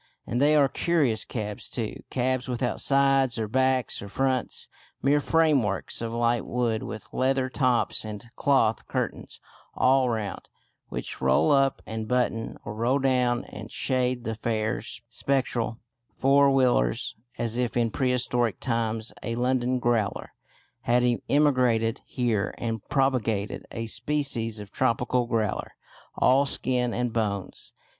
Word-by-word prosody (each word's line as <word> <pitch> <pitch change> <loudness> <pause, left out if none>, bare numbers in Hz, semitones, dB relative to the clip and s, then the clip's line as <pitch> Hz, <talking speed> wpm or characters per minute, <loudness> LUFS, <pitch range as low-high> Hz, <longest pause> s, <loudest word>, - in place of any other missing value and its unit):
And 120 - -1
they 150 +2 +5
are 145 -2 +5
curious 140 -8 +1
cabs 105 -3 -4
too: 110 -4 -3
cabs 130 0 -1
without 125 0 -1
sides 135 -2 +3
or 110 -1 -1
backs 130 +1 +1
or 100 - -8
fronts; 130 +2 -1 0.4
mere 145 +2 +4
frameworks 145 - +1
of 115 -1 -3
light 120 0 +1
wood 120 -3 -1
with 110 - -7
leather 130 0 +1
tops 125 -3 +1
and 105 +1 -7
cloth 125 -6 +2
curtains - - -4 0.4
all 130 0 +3
round, 110 -4 -4 0.4
which - - -5
roll 65 - +3
up 135 -1 +2
and 110 0 -5
button, 125 -2 -1
or - - -5
roll 120 +5 +1
down 125 -3 +1
and 105 +1 -9
shade 125 -2 0
the 115 - -2
"fare"; 110 0 -1
spectral 120 -1 -2 0.4
four 140 +1 +5
wheelers, 125 - +2 0.2
as 115 0 -2
if 125 -1 -1
in 115 -2 +1
prehistoric 125 -3 0
times 115 -2 -1
a 115 - -3
London 125 +1 +1
"growler" 120 -4 -1 0.5
had 120 +1 +2 0.3
emigrated 125 -6 +2
here 115 -6 -1
and 115 -3 -3
propagated 120 -7 0
a 115 0 -4
species 115 -3 -1
of 105 -1 -9
tropical 120 +1 +1
growler, 110 -4 -1 0.4
all 135 +2 +4
skin 125 -2 0
and 120 0 -2
bones. 100 -4 -2
120 Hz, 135 wpm, -26 LUFS, 115-130 Hz, 0.5 s, they